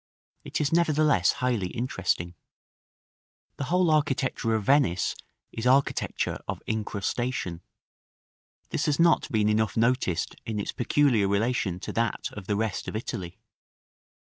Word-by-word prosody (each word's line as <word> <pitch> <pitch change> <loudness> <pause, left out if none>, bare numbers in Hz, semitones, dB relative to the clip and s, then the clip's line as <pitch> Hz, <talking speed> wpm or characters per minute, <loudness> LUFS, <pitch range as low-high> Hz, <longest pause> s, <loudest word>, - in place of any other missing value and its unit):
It - - -3
is 150 +1 0
nevertheless 155 - +3
highly 125 -8 0
interesting. 95 -6 -2 1.2
The 140 - -3
whole 180 +5 +2
early 155 -1 +5
architecture 135 -6 0
of 110 - -1
Venice 130 - +2 0.4
is 115 +2 -2
architecture 135 +2 +1
of - - -4
incrustation: 110 -3 -2 1.1
this - - -1
has 145 0 +1
not 170 -3 +3
been 105 -3 +2
enough 110 +1 +1
noticed 115 -7 +1
in 110 -2 -3
its 100 - -2
peculiar 120 -5 +2
relation 100 -3 0
to - - -5
that 115 -1 -1
of 100 -3 -9
the 105 - +1
rest 110 -2 -2
of - - -4
Italy. 95 -5 -5
115 Hz, 135 wpm, -27 LUFS, 100-140 Hz, 1.2 s, early